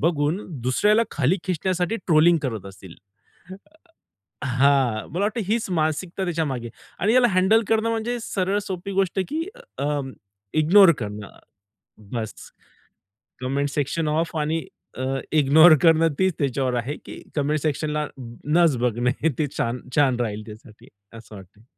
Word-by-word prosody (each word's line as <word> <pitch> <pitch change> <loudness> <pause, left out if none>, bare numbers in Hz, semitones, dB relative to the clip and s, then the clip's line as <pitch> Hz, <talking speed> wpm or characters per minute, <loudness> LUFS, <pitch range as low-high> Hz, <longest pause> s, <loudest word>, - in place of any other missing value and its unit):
बघून 155 +1 +1 0.2
दुसऱ्याला 210 - +3
खाली 155 +6 +1
खेचण्यासाठी 185 +3 -1
ट्रोलिंग 165 +1 +5
करत 110 -8 -4
असतील. 95 -2 -12 1.5
अ, - - -2
हां 130 -3 +2
मला 185 +5 -2
वाटत 215 +3 -2
हीच 225 0 0
मानसिकता 170 +3 -1
त्याच्यामागे 150 -9 -2 0.3
आणि 210 +5 +2
याला 250 -1 +5
हँडल 190 +5 +3
करणं 225 0 +2
म्हणजे 230 +2 -2
सरळ 195 -2 -1
सोपी 190 +1 -5
गोष्ट 195 -1 0
आहे 190 - +1
की 315 +3 -2 0.3
अं, 145 -2 -2 0.4
इग्नोर 170 +4 +6
करणं 105 -2 -6 0.8
बस. 110 -3 -4 1.1
कमेंट 140 +3 -1
सेक्शनला 150 +2 -1
ऑफ 165 -1 -4
आणि 155 +1 -1 0.3
अ, - - -3 0.4
इग्नोर 155 +3 +7
करणं 165 -1 +5
तेच 190 0 +2
त्याच्यावर 130 -2 0
आहे 125 +5 -3
की - - -10
कमेंट 150 +1 +1
सेक्शनला 150 0 -1 0.4
नचं 155 -2 +3
बघणे 125 +5 0
ते 155 - +1
छान, 120 +2 -2 0.2
छान 130 -4 +3
राहील 110 -2 -3
त्यासाठी 110 0 -14 0.3
असं 110 -1 -14
वाटतंय. 100 +3 -15
150 Hz, 140 wpm, -23 LUFS, 130-185 Hz, 1.5 s, इग्नोर